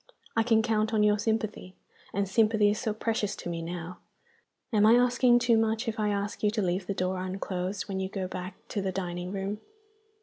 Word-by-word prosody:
I 225 - +4
can 225 -1 +3
count 220 -1 +1
on 210 - +4
your 210 0 +3
sympathy 215 -4 -2 0.4
and 200 0 -1
sympathy 215 0 +3
is 210 - -2
so 225 -4 -1
precious 220 -1 -1
to - - -6
me 170 -1 -3
now! 175 +1 -6 0.7
Am 210 -1 +4
I 220 +2 +7
asking 245 0 +4
too 240 -2 +3
much, 225 +2 0
if 220 -1 -2
I 210 -1 +1
ask 205 0 -2
you 210 - +3
to 215 +1 -1
leave 180 +1 -1
the 200 - -2
door 185 0 -1
unclosed 185 +1 -3
when 195 -2 -3
you 190 0 -2
go 190 -2 -3
back 185 +1 -6
to 205 - -2
the 190 -1 -1
dining 180 -1 -4
room? 200 +2 -3
205 Hz, 210 wpm, -28 LUFS, 185-220 Hz, 0.7 s, I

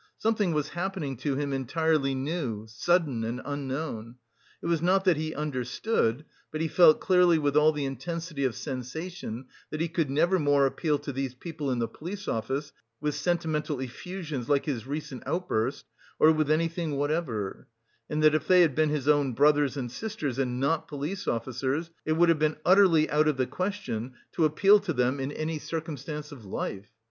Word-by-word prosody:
Something 215 -4 +1
was 150 -2 -1
happening 175 -6 -3
to 135 +3 -1
him 140 0 -2
entirely 135 +1 +1
new, 130 -6 -3
sudden 140 +1 +1
and 115 +2 -3
unknown. 135 -4 -4 0.4
It - - -10
was 170 -2 +1
not 190 +3 +3
that 180 -3 +5
he 155 +1 -3
understood, 145 - -1 0.3
but 155 - -4
he 160 - 0
felt 160 -1 +6
clearly 180 -2 +4
with 145 -2 0
all 150 +1 +6
the 150 -2 -3
intensity 155 +3 -4
of 130 -4 0
sensation 130 - -5 0.2
that 155 - -5
he 165 - +1
could 165 -3 -1
never 170 +7 +2
more 145 -2 +4
appeal 150 +2 0
to 140 - -6
these 135 -1 -3
people 155 0 -5
in 125 - 0
the 115 -1 0
police 190 - -7
office 135 +6 -2 0.3
with 150 0 -1
sentimental 155 -5 -1
effusions 150 0 -5
like 140 -1 +2
his 130 -6 -3
recent 140 -3 -5
outburst, 140 -8 -1 0.3
or 155 - +6
with 155 -2 +1
anything 165 -1 0
whatever; 145 - -2 0.4
and 155 0 -1
that 155 -1 +6
if 155 - 0
they 185 -1 +7
had 160 -5 +4
been 155 +2 +2
his 145 -2 -2
own 145 -3 +3
brothers 145 +2 +3
and 125 -3 -4
sisters 150 - -4
and 125 -2 -1
not 150 +4 0
police 155 +7 -4
officers, 130 +7 -2
it 155 - +2
would 170 +2 +4
have 165 -2 +3
been 155 0 +1
utterly 180 -5 +6
out 155 +1 +3
of 150 -3 +1
the 130 - +2
question 130 - -3 0.2
to 165 - +2
appeal 195 +7 +5
to 200 -4 -3
them 125 +1 +1
in 135 +1 -2
any 155 +1 -3
circumstance 150 -1 -5
of 135 -6 -11
life. 100 +1 -5
150 Hz, 185 wpm, -28 LUFS, 135-165 Hz, 0.4 s, they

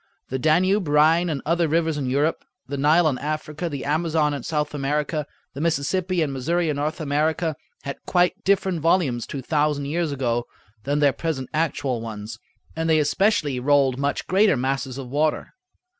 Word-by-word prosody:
The 130 - -2
Danube, 180 +6 +2
Rhine, 160 +4 +4
and 145 -4 -3
other 170 +1 +2
rivers 160 0 +1
in 140 -3 -2
Europe, 145 +5 0 0.2
the 140 - -4
Nile 155 +4 +4
in 135 -4 0
Africa, 155 +2 -3
the 140 -4 -5
Amazon 155 0 +1
in 140 - -4
South 150 +1 -2
America, 145 +1 -1 0.3
the 140 - -6
Mississippi 170 +3 0
and 140 -3 -3
Missouri 165 +6 0
in 145 - -1
North 150 +3 -2
America, 155 +2 0 0.3
had 140 -1 -5
quite 180 0 +2
different 190 -3 +1
volumes 155 -8 +1
two 135 - -6
thousand 150 -1 0
years 160 +2 -1
ago 120 -3 -1 0.4
than 145 +2 0
their 140 -2 +4
present 150 -6 -3
actual 140 -6 -1
ones, 110 -1 -7 0.4
and 165 0 -1
they 160 - +5
especially 150 -3 +1
rolled 135 -1 +2
much 140 0 -1
greater 190 -4 +3
masses 135 0 -2
of 135 -2 -6
water. 150 +4 -1
150 Hz, 175 wpm, -23 LUFS, 140-165 Hz, 0.4 s, they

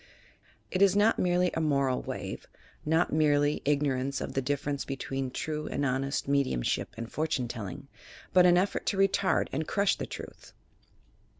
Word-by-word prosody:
It 185 - -1
is 200 -1 +5
not 210 +2 +3
merely 180 0 +2
a 160 - -1
moral 140 -4 +1
wave, - - -6 0.4
not 160 +2 +1
merely 145 -1 +2
ignorance 140 -2 0
of - - -5
the 135 - 0
difference 140 +1 -2
between 135 -1 -4
true 150 +3 -4
and 145 - -1
honest 135 +1 -1
me 140 0 +3
diumship - - -1
and 115 0 -5
fortune 155 -5 -1
telling, 115 +1 -7 0.5
but 180 -1 +7
an 175 0 +5
effort 190 +3 0
to 200 - 0
retard 195 0 +2
and 155 +3 -2
crush 200 -1 +2
the - - -5
truth. - - -10
145 Hz, 165 wpm, -29 LUFS, 135-175 Hz, 0.5 s, but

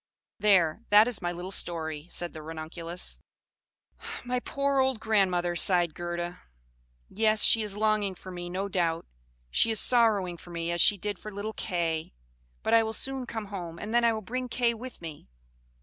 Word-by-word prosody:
There, 195 -3 +3
that 210 +2 +7
is 245 -4 +1
my 175 -1 -1
little 175 +2 -6
story," 160 -4 -2
said 175 -1 -2
the 155 - -8
Ranunculus. 165 +2 -6 1.1
"My 250 0 -1
poor 280 +2 -1
old 265 -3 +2
grandmother!" 185 -5 +1
sighed 175 -2 +4
Gerda. 175 0 -5 0.7
"Yes, 215 0 +2
she 225 - +6
is 210 -2 -3
longing 215 -2 +1
for 185 - -10
me, 175 -1 -6
no 190 +3 -3
doubt: 170 -4 -1 0.5
she 230 - +4
is 220 -2 +1
sorrowing 210 -8 +4
for 175 - -14
me, 170 0 -3
as 170 0 +1
she 210 -4 +5
did 205 0 -4
for 215 - -8
little 205 +2 -5
Kay. 165 - -2 0.5
But - - 0
I 230 - +7
will 220 0 -2
soon 265 +1 -1
come 220 -3 -5
home, 170 -3 -6
and 210 +5 -6
then 240 0 +4
I 235 - +5
will 220 -1 -3
bring 250 +4 -4
Kay 235 0 +1
with 235 -4 -10
me. 155 - -9
195 Hz, 180 wpm, -28 LUFS, 175-220 Hz, 1.1 s, that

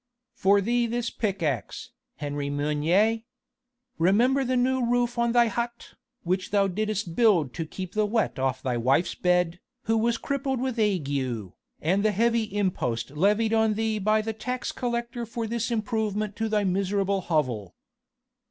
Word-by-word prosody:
"For 200 +1 +3
thee 240 +3 +1
this 235 0 -2
pick 200 -5 -2
axe, 135 -9 -3 0.2
Henri 145 -1 -3
Meunier! 150 +10 +2 0.8
Remember 235 +11 +3
the 255 0 0
new 255 +1 +2
roof 240 0 +1
on 235 0 +2
thy 240 0 +5
hut, 235 +1 -4 0.3
which 185 +2 -1
thou 200 -1 +3
didst 205 -2 -2
build 185 - +3
to 165 -2 -4
keep 185 +2 -7
the 215 0 +1
wet 220 - 0
off 130 -1 -1
thy 125 -2 0
wife's 130 +8 +2
bed, 180 -1 +1 0.2
who 225 - +1
was 230 +1 +2
crippled 270 -1 -2
with 255 -2 -2
ague 190 -10 +1 0.7
and 185 +6 +2
the 215 -1 +2
heavy 230 +2 +2
impost 175 - -2
levied 210 +8 +2
on 220 -1 +3
thee 220 0 0
by 215 +2 +2
the 225 +1 -3
tax 250 +4 -4
collector 240 -1 -3
for 230 0 -4
this 230 +1 -2
improvement 215 -2 -1
to 225 0 -1
thy 210 -1 +1
miserable 195 +1 0
hovel. 130 - -1
210 Hz, 160 wpm, -26 LUFS, 180-235 Hz, 0.8 s, thy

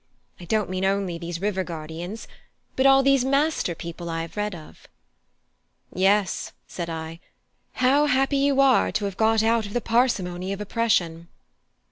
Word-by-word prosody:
I 175 - -10
don't 215 +3 0
mean 185 0 -2
only 190 -3 0
these 170 0 -5
river 195 -2 -1
guardians, 170 +5 -7 0.5
but 260 +1 +4
all 270 0 +6
these 275 -1 +4
master 275 - +1
people 170 +1 -7
I 165 0 -2
have 165 - -10
read 210 -2 -2
of." 155 -2 -14 1.1
"Yes," 195 +2 +1
said 170 -2 -5
I, 160 0 -6 0.5
"how 275 +4 +3
happy 270 +1 +2
you 275 0 +2
are 270 -2 +4
to 210 - -1
have 200 -2 -4
got 220 +1 +2
out 225 -1 +2
of 200 - -10
the 245 - +1
parsimony 195 -7 0
of 200 - -6
oppression!" 190 -6 0
200 Hz, 160 wpm, -24 LUFS, 175-245 Hz, 1.1 s, all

